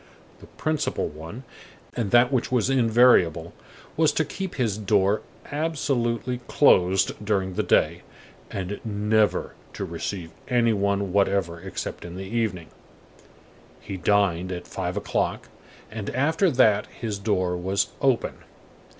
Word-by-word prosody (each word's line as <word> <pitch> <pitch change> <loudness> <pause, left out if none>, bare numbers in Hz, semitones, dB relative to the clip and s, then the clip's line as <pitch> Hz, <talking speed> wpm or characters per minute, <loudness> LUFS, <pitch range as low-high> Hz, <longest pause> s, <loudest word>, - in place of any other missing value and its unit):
The - - -14
principal 155 - -2
one, 80 - -9 0.5
and 115 -5 -1
that 120 +3 +5
which 125 -1 0
was 125 0 +2
invariable, 115 -10 +4 0.4
was 160 0 +3
to 160 - +1
keep 190 -2 -5
his 115 -6 0
door 105 0 +2 0.3
absolutely 135 -6 -1
closed 95 -6 +3
during 95 -3 0
the - - 0
day, - - +2 0.5
and 95 +1 -4
never 105 0 +1 0.2
to 100 - -4
receive 85 0 -5 0.2
any 120 -2 +3
one 100 -2 0
whatever 95 -4 +1
except 95 0 -6
in 85 0 -8
the 95 - -6
evening. 95 -7 -2 1.1
He 95 - -7
dined 95 -2 +1
at 90 -1 -5
five - - -4
o'clock, - - -2 0.4
and 110 -2 -5
after 160 +9 +2
that 115 -7 +3
his 110 -4 -5
door 95 -4 0
was 95 +3 0
open. 135 -4 +2
105 Hz, 130 wpm, -25 LUFS, 95-120 Hz, 1.1 s, that